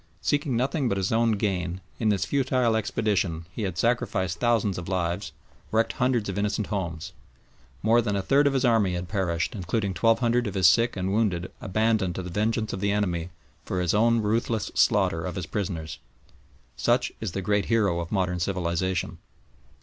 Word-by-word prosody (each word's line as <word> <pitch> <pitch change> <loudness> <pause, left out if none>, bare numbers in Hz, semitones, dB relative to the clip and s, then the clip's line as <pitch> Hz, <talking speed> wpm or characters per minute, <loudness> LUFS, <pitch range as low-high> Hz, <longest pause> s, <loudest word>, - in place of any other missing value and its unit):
Seeking 145 -1 0
nothing 135 +1 0
but 100 - 0
his 95 0 -1
own 115 0 +3
gain, 95 -4 -1 0.2
in 110 - +2
this 100 -2 +1
futile 125 -1 +1
expedition 100 -6 -1
he 110 - -6
had 95 -5 -3
sacrificed 100 -6 0
thousands 115 -6 +1
of 85 - -7
lives, 90 +1 -2 0.4
wrecked 115 +1 +1
hundreds 125 -4 +1
of 100 0 -3
innocent 105 +1 0
homes. 85 -5 -4 0.7
More 115 +3 +4
than 105 -3 -1
a 100 - -1
third 140 +5 +4
of 140 - +1
his 135 -1 +1
army 110 -6 +3
had 90 0 -4
perished, 95 +1 -1
including 100 0 -2
twelve 115 +5 +3
hundred 120 -1 +1
of 100 - -5
his 95 -2 +2
sick 115 +6 +4
and 95 +1 -1
wounded 95 -5 0
abandoned 105 -2 +1
to 95 - -4
the 90 - -7
vengeance 110 +3 -1
of 95 - -4
the 100 +1 +1
enemy 90 -5 -1 0.3
for 90 - -3
his 90 0 +1
own 115 +2 +3
ruthless 110 0 0
slaughter 80 0 +2
of 90 +1 -4
his 90 -4 -3
prisoners. 85 -4 -4 0.8
Such 120 0 +1
is 105 -6 -3
the 95 - -3
great 105 +1 +1
hero 100 -7 +2
of 85 -1 -5
modern 90 -3 0
civilisation! 90 0 -1
100 Hz, 185 wpm, -26 LUFS, 90-115 Hz, 0.8 s, More